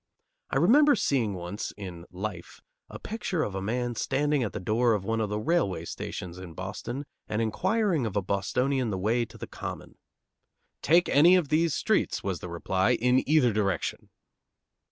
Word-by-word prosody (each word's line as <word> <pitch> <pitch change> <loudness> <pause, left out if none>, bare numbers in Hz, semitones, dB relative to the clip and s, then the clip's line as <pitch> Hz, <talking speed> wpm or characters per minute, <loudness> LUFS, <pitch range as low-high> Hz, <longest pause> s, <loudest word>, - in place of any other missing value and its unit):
I - - 0
remember 280 - +6
seeing 120 - 0
once, 90 +3 -5
in 90 -4 -8
Life, 90 -1 -6 0.3
a - - -8
picture 195 -7 -3
of 100 - -3
a 95 - -3
man 120 +4 -1
standing 145 +4 0
at 115 - -1
the - - -5
door 115 +5 +2
of 95 -2 -4
one 115 +1 0
of 105 - -1
the 105 - -2
railway 105 - 0
stations 90 +1 -6
in 90 -3 -9
Boston 105 +9 -5 0.2
and 105 - -1
inquiring 175 - +1
of 100 - -6
a 100 - +2
Bostonian 125 +7 0
the 95 - -2
way 115 +5 +1
to - - -15
the - - -6
Common. - - -8 0.8
"Take 170 +5 +4
any 170 +6 +6
of 175 -6 +1
these 160 0 +2
streets," 220 - 0
was 95 -4 -2
the 90 - -7
reply, 95 +6 +1
"in 125 +2 +2
either 145 -7 +4
direction." 100 -5 -1
115 Hz, 175 wpm, -28 LUFS, 95-145 Hz, 0.8 s, remember